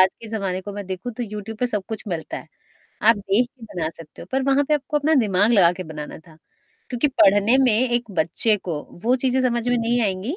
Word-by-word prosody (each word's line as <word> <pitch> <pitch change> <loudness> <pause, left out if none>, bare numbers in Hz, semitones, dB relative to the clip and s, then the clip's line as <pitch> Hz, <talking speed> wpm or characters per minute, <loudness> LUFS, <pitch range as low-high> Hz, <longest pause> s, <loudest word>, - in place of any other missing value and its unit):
आज 185 - +7
के 225 - -7
ज़माने 195 -4 -2
को 205 - -7
मैं 200 -1 -6
देखूँ 190 +6 -5
तो 245 - -5
यूट्यूब 215 0 -7
पे 250 - +1
सब 210 -4 -2
कुछ 220 -1 -5
मिलता 165 -4 -4
है। - - -9 0.6
आप 225 - +7
देख 200 +4 +1
के 255 -3 -25
बना 165 -3 -1
सकते 160 -2 -12
हो, - - -11
पर 265 0 +1
वहाँ 280 +1 +3
पे 305 - +4
आपको 295 +1 -2
अपना 310 +2 +2
दिमाग 205 +1 +2
लगा 180 -6 +5
के 185 - -6
बनाना 150 -1 -8
था, 160 0 -19 0.5
क्योंकि 245 +4 +1
पढ़ने 205 +5 +5
में 250 - +4 0.2
एक 240 -2 -1
बच्चे 210 +7 +2
को 170 -6 -5 0.2
वो 250 +2 +3
चीज़ें 260 0 +1
समझ 240 -2 0
में 245 - +2
नहीं 235 +1 +1
आएँगी, 200 - -1
215 Hz, 235 wpm, -22 LUFS, 185-245 Hz, 0.6 s, आज